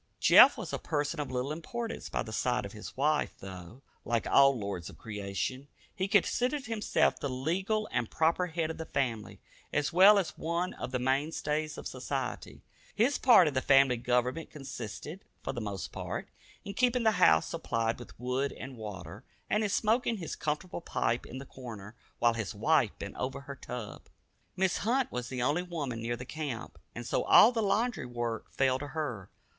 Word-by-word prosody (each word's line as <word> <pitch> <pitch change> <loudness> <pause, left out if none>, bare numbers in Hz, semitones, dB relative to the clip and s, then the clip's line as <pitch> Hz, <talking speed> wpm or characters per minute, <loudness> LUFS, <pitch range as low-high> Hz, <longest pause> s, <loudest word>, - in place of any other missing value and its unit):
Jeff - - +8
was - - -6
a - - -1
person 150 +1 -2
of 145 - -3
little 130 +2 -2
importance 230 +9 -5
by - - -1
the 110 - -8
side 125 -1 0
of 100 - -7
his 105 +4 -9
wife, 150 +2 +1
though, 95 +6 -10 0.2
like 115 -1 0
all 140 -1 +5
"lords 100 -6 -4
of - - -13
creation," 105 +6 -4 0.3
he 190 -1 -1
considered 250 +8 +2
himself 225 -2 +1
the 140 - -2
legal 190 +11 -1
and 120 -2 -1
proper 165 +3 +2
head 160 -1 -2
of 160 - -9
the 160 - -4
family, 115 -6 -2 0.3
as 150 +2 0
well 195 +4 +8
as 175 -7 0
one 170 +3 -2
of - - -5
the 130 - -1
mainstays 150 +3 -1
of - - -8
society. - - -4 0.3
His 250 +7 +2
part 230 -9 +7
of 150 - 0
the 130 - +1
family 135 -2 +5
government 125 +6 0
consisted, 140 - -7 0.2
for - - -3
the 120 - -4
most 100 -4 -5
part, - - -5 0.4
in 200 - -5
keeping 250 0 +2
the 220 - +5
house - - +6
supplied 115 -9 -2
with 120 - -12
wood 125 +3 -1
and 130 -1 -8
water, 95 -7 -8 0.3
and 210 - +3
in 210 - 0
smoking 225 +3 +1
his 170 -5 -5
comfortable 155 +4 -3
pipe 120 -6 -1
in 130 - -8
the 135 - -7
corner, 115 -6 -9 0.2
while 120 -1 +3
his 110 -3 -4
wife 120 +2 +3
bent - - -7
over 135 +2 -3
her 140 0 -8
tub. 125 -5 -8 0.5
Mrs. 185 -1 +2
Hunt 250 +4 +1
was 125 0 -4
the 125 -2 -2
only 145 +7 +2
woman 150 -10 -4
near 120 +1 -2
the 125 - -7
camp, 130 - -5 0.2
and 120 - -6
so - - 0
all 230 - +8
the 230 -2 -1
laundry 220 - 0
work 120 -2 -4
fell 130 -1 +2
to 145 - -5
her. 140 - -4
140 Hz, 190 wpm, -30 LUFS, 120-175 Hz, 0.5 s, Jeff